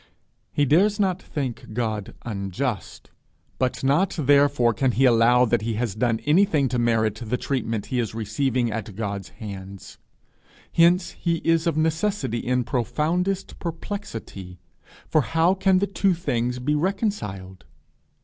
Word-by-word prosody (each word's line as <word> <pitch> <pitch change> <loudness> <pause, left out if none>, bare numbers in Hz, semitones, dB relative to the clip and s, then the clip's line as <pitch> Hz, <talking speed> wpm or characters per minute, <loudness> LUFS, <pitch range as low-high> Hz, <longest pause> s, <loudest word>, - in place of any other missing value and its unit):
He 145 - +2
dares 200 - +3
not 190 -2 +1
think 130 -6 -5
God 110 -3 -3
unjust, 105 +2 -4 0.5
but 130 +1 -1
not 145 +9 +2
therefore 140 -4 +4
can 130 +1 +1
he 130 +6 +3
allow 120 +1 +5
that 120 -1 +1
he 110 0 -2
has 115 -2 -1
done 115 +1 0
anything 155 -2 +3
to 125 - -1
merit 110 -2 +1
the 115 +2 -1
treatment 115 -6 -2
he 125 - +1
is 115 -2 -2
receiving 120 +2 0
at 110 -1 -4
his 100 -2 -5
hands. 100 -3 -9 0.7
Hence 170 +1 +3
is 170 -2 0 0.2
he - - +2
of 160 - -3
necessity 160 - 0
in 125 +1 0
profoundest 155 - -1
perplexity, 155 - -6 0.5
for 155 - +3
how 165 +5 +2
can 190 -1 +3
the 195 - +2
two 195 -2 +1
things 125 -7 -1
be 130 +4 -1
reconciled? 150 - -2
125 Hz, 140 wpm, -24 LUFS, 110-165 Hz, 0.7 s, allow